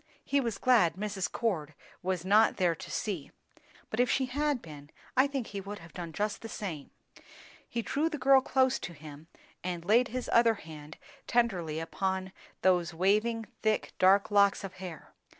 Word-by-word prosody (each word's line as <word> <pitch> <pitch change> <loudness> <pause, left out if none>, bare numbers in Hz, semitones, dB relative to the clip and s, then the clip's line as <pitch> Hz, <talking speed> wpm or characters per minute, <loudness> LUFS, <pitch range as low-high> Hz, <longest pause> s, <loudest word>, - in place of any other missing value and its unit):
He 280 0 +2
was 230 -5 -2
glad 210 -11 +4
Mrs. 200 -1 -3
Cord 160 -10 -2 0.3
was 185 -1 -2
not 210 +3 +4
there 180 -3 +3
to 165 - -10
see; 185 -10 -3 0.6
but 220 - -3
if 245 0 +3
she 265 - +2
had 285 +1 0
been, 150 -6 -12 0.3
I 260 +2 +5
think 275 -4 -3
he 200 -2 -6
would 200 +2 -7
have 165 -2 -14
done 170 -2 -6
just 210 +5 -2
the 225 - -7
same. 170 -10 -5 0.8
He 235 -1 -2
drew 305 +7 0
the 310 - -4
girl 270 -1 +5
close 260 0 +2
to 170 +1 -6
him, 150 0 -12 0.4
and 175 -2 -4
laid 235 +6 +4
his 250 0 -4
other 230 -1 +5
hand 155 -4 -11 0.3
tenderly 180 -10 +1
upon 190 +3 -2 0.3
those 175 -3 +2
waving, 215 +6 +1 0.2
thick, 215 -1 0
dark 195 +3 +5
locks 200 0 +4
of 195 -2 -6
hair. 180 -4 -9
200 Hz, 175 wpm, -30 LUFS, 170-235 Hz, 0.8 s, I